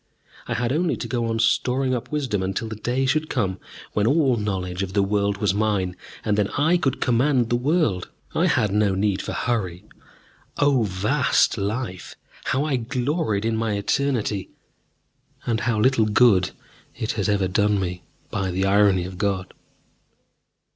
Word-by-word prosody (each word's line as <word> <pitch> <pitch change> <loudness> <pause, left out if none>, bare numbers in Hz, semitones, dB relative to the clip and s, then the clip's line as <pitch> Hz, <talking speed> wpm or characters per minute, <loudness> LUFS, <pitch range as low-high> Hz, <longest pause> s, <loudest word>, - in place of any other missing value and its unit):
I - - -2
had 120 +2 0
only 165 +2 +1
to - - -5
go 120 -2 -1
on 115 0 -1
storing 125 +3 +1
up 125 +3 -4
wisdom 135 -10 -1
until 95 +4 -2
the 110 - -5
day 125 +5 -1
should 155 +4 0
come 95 -8 -1 0.3
when 105 +1 +1
all 140 -2 +3
knowledge 95 -4 -3
of 95 -1 -3
the 100 -1 +3
world 100 0 0
was 100 -2 +1
mine, 100 -4 0 0.3
and 105 -1 +1
then 100 - +2
I 160 +5 +3
could 140 -7 -1
command 125 0 +2
the - - +4
world. 125 - +1 0.2
I - - +2
had 105 - +2
no 105 -2 +2
need 100 0 0
for - - -5
hurry. 95 -8 -2 0.7
O 145 -3 +3
vast 110 +10 +2
life! 100 -3 -4 0.3
How 135 +3 +1
I 145 -4 +1
gloried 125 - -1
in 115 0 +1
my 110 -1 -1
eternity! 105 -1 -1 1.0
And 115 -2 0
how 110 0 0
little 120 -1 +3
good 105 -4 +4 0.5
it 110 - -2
has 100 -3 -1
ever 100 -2 +2
done 105 +2 +2
me, 90 -1 -3 0.3
by 95 -1 -1
the 95 +2 0
irony 100 -2 +3
of 90 0 -8
God. 100 -3 -1
110 Hz, 170 wpm, -23 LUFS, 100-125 Hz, 1.0 s, the